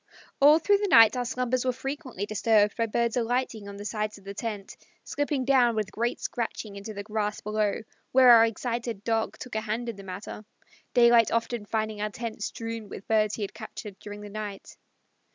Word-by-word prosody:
All 295 +2 +8
through 400 +5 +3
the 410 - 0
night 230 - +7
our 250 -1 -1
slumbers 250 0 -1
were 255 - +1
frequently 270 -5 -5
disturbed 210 0 +2
by 230 -1 0
birds 235 +1 0
alighting 240 -3 -1
on 200 - -9
the 205 - -8
sides 215 -1 -3
of 200 - -17
the 200 +1 -7
tent, 210 -2 -5 0.3
slipping 290 -2 -2
down 250 -3 +4
with 215 -2 -2
great 235 +2 -2
scratching 225 -3 -4
into 200 +2 -7
the 205 -1 -6
grass 210 0 -2
below, 210 0 -1 0.3
where 255 -1 +7
our 230 -1 +8
excited 235 -2 -4
Dog 225 0 -1
took 255 - -9
a 220 - -1
hand 225 +2 -3
in 225 - -6
the 195 - -10
matter, 195 +3 -7 0.5
daylight 235 -2 +6
often 230 -2 -1
finding 215 -1 -2
our 210 - -1
tent 225 0 -6
strewn 225 0 -5
with 195 - -9
birds 215 -1 +2
he 215 - -4
had 200 - -5
captured 215 -3 -9
during 205 0 -9
the 205 - -8
night. 205 -1 -7
225 Hz, 200 wpm, -27 LUFS, 210-240 Hz, 0.5 s, All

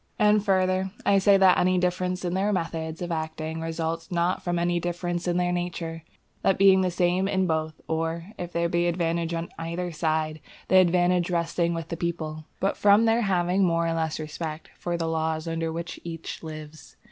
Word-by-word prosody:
And 210 -1 +4
further, 185 -1 +2 0.2
I 200 -1 +5
say 195 +1 +5
that 190 -2 +5
any 185 +1 +3
difference 180 0 -1
in 175 - -1
their 195 +3 +1
methods 165 -3 -3
of 175 - -4
acting 160 0 -3
results 165 +1 -3
not 175 +1 +1
from 175 -1 -1
any 175 0 +1
difference 175 0 -3
in 175 0 +1
their 180 0 +1
nature, 175 -2 -3 0.4
that 195 - +2
being 190 -1 +6
the 185 - +1
same 180 +2 +1
in 190 -1 +1
both, 160 -2 -2
or, 165 +3 -2
if 175 -1 -5
there 170 0 0
be 175 0 +1
advantage 170 -1 0
on 165 +1 -4
either 170 +2 -3
side, 155 -1 -1 0.3
the 190 - +6
advantage 180 -1 +3
resting 170 0 0
with 165 -1 -5
the 170 - -4
people, 155 -2 -3
but 195 - 0
from 205 +2 +5
their 225 +1 +3
having 185 -2 +2
more 170 -2 +2
or 165 - 0
less 160 -1 -1
respect 155 +1 -6
for 175 -1 -3
the 165 - -2
laws 160 0 -1
under 165 0 -2
which 165 +1 -5
each 165 -1 -6
lives. 155 -1 -10
170 Hz, 195 wpm, -26 LUFS, 165-180 Hz, 0.4 s, being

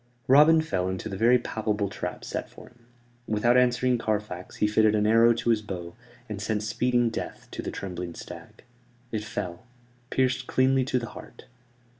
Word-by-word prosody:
Robin 150 +4 +6
fell 95 -11 -1
into 95 +3 -4
the 100 - -5
very 120 +5 +5
palpable 105 -3 -2
trap 90 -3 -6
set - - -4
for - - -13
him. 120 -1 -23 0.4
Without 110 +3 +2
answering 125 0 +3
Carfax, 105 -5 -3
he - - +1
fitted 110 0 +3
an 105 0 +2
arrow 115 +2 +5
to 115 0 0
his 110 -2 +2
bow, 90 -5 -7 0.3
and 105 -2 -5
sent 110 0 -1
speeding 120 +2 +1
death - - -6
to - - -5
the - - -4
trembling 90 -3 -6
stag. - - -11 0.5
It 110 -2 -2
fell, 90 0 -6 0.4
pierced 130 0 0
cleanly 130 0 +2
to 130 -1 0
the 120 -2 -4
heart. - - -12
110 Hz, 175 wpm, -26 LUFS, 105-125 Hz, 0.5 s, Robin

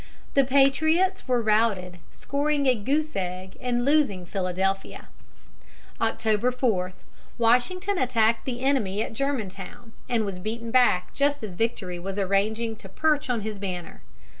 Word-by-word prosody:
The 275 - +5
patriots 315 +8 +3
were 245 -2 +1
routed, 210 -5 +1
scoring 285 0 -1
a 260 - +5
goose 290 +8 -1
egg 185 0 -4
and 245 -1 0
losing 275 -11 +2
Philadelphia. 190 +1 -2 0.9
October 225 +1 +1
4, 215 -8 0 0.4
Washington 355 - +2
attacked 230 -2 +2
the 245 -2 -4
enemy 220 -7 +1
at - - -7
Germantown, 225 -3 -4 0.2
and 230 -3 +1
was 195 -2 -5
beaten 230 +4 -4
back 235 -8 +3
just 285 -2 +1
as 205 -4 -5
victory 185 -3 -2
was 195 +2 -5
arranging 215 +4 0
to 195 - -12
perch 300 +5 +1
on 240 -3 0
his 210 -1 -5
banner. 180 - -5
225 Hz, 140 wpm, -26 LUFS, 195-270 Hz, 0.9 s, The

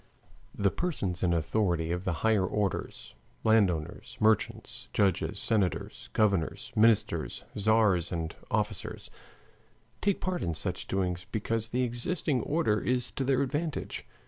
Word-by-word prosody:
The 100 -1 +2
persons 100 - -2
in 90 - +2
authority 85 0 +1
of 90 +1 -2
the 95 - +1
higher 110 -4 +4
orders 90 -10 -2 0.3
landowners, 95 -9 +1
merchants, 110 +2 +1
judges, 100 -4 +1
senators, 100 -5 -1
governors, 100 -7 +1
ministers, 110 -1 +2
tzars, 105 -4 +3
and 80 -2 -3
officers 105 -3 -2 0.9
take 200 -2 +1
part 185 -1 -2
in 85 -2 -1
such 90 +2 -3
doings 90 -2 -1
because 110 0 -1
the 125 +2 0
existing 125 +3 0
order 145 -9 +1
is 125 0 0
to 135 - -2
their 135 0 +2
advantage. 145 +3 -3
105 Hz, 125 wpm, -29 LUFS, 90-120 Hz, 0.9 s, higher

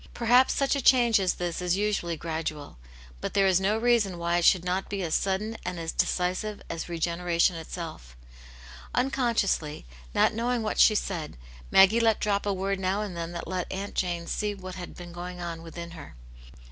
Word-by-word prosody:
Perhaps 245 +2 +4
such 275 0 +2
a 280 - -1
change 240 -4 +5
as 185 -2 +1
this 175 -1 -3
is 180 +1 +1
usually 200 -5 -1
gradual. 155 - -5 0.4
But - - -5
there 195 -1 +4
is 190 -1 +3
no 205 +3 +2
reason 225 -6 +2
why 170 0 0
it 170 - 0
should 180 -2 +5
not 185 +2 -1
be 200 -2 -3
as 160 -2 -2
sudden 210 +4 0
and 180 -1 -4
as 165 0 -3
decisive 185 +4 -1
as 165 +1 -5
regeneration 170 +1 +1
itself. 160 - -8 0.8
Unconsciously, 235 - 0 0.3
not - - +4
knowing 235 +1 -1
what 215 - -2
she 215 - +7
said, 170 - -3 0.3
Maggfie 195 +5 +6
let 225 -2 +3
drop 205 -1 0
a - - +2
word 195 0 -1
now 190 +2 0
and 195 -4 -6
then 170 0 -4
that 170 - -6
let 185 -1 -3
Aunt 195 +2 -4
Jane 175 -2 -1
see 210 +3 -2
what 185 -1 -8
had 180 -1 -8
been 175 -1 -9
going 180 +1 -7
on 170 -1 -5
within 170 +1 -8
her. 165 - -11
185 Hz, 190 wpm, -27 LUFS, 170-210 Hz, 0.8 s, she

